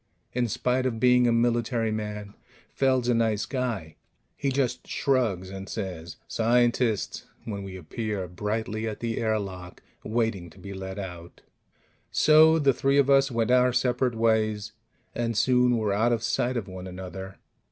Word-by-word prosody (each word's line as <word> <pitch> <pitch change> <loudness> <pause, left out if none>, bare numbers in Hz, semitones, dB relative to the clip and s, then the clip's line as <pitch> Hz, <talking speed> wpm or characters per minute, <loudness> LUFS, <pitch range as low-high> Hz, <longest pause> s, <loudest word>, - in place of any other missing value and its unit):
In 125 -1 +1
spite 125 +4 0
of 115 -3 -3
being 125 0 +5
a - - +3
military 115 -1 +1
man, 105 -1 -5 0.4
Feld's 130 -2 +2
a 125 - +3
nice 110 -2 +1
guy; 115 - -3 0.4
he 140 - -1
just 130 -2 -1
shrugs 110 -10 0
and 95 0 -7
says, 90 -6 -5
"Scientists!" 120 -2 +1 0.2
when 100 -3 -4
we 95 -1 -7
appear 100 +2 -4
brightly 110 +4 -3
at 110 - -5
the 115 -1 -2
airlock, 100 -5 -3 0.2
waiting 110 -6 -1
to - - -19
be 100 0 -8
let 95 0 -6
out. 90 -3 -8 0.7
So 155 +1 +6
the 140 -4 +3
three 135 +3 +1
of 140 -1 +4
us 135 0 +5
went 115 -1 0
our 125 0 +5
separate 125 0 +1
ways, 110 -2 +1 0.4
and 115 -2 -2
soon 125 -1 +3
were 105 -3 0
out 115 +4 +2
of 115 -1 -2
sight 125 +2 0
of 105 -4 -3
one 95 0 -8
another. 95 +1 -8
115 Hz, 160 wpm, -26 LUFS, 100-125 Hz, 0.7 s, So